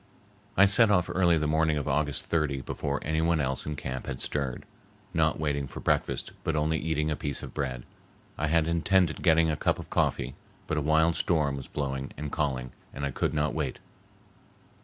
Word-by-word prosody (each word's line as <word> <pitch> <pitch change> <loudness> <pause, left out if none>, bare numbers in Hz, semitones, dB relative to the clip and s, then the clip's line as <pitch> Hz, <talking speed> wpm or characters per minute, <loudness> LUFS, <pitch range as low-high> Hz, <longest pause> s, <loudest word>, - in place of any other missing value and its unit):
I 95 - +8
set 105 +3 +5
off 90 -3 +2
early 85 -2 +4
the 75 - 0
morning 80 0 +2
of 75 - -3
August 75 0 0
30 75 -5 0
before 70 +2 -3
any 80 +1 0
one 85 0 +2
else 65 -1 -1
in 75 - -2
camp 65 -2 -5
had 65 -2 -4
stirred, 70 -4 -2 0.5
not 80 -1 +2
waiting 70 -2 -1
for - - -8
breakfast, - - 0
but 80 - 0
only 80 +1 +1
eating 80 -1 0
a - - +1
piece 70 -1 -4
of - - -8
bread. 65 -4 -3 0.5
I 75 - -1
had 80 0 +2
intended 85 0 +2
getting 80 -2 +4
a - - 0
cup - - +1
of - - -9
coffee, 60 +1 0 0.3
but 80 - -1
a - - -1
wild 80 +3 +3
storm 75 -5 +1
was 70 -1 -7
blowing 70 -1 -3
and 75 -1 -5
calling, 65 -5 -1 0.2
and 70 - -3
I 70 - -2
could 70 - -1
not 75 0 +1
wait. 75 -5 -2
75 Hz, 200 wpm, -28 LUFS, 70-80 Hz, 0.5 s, I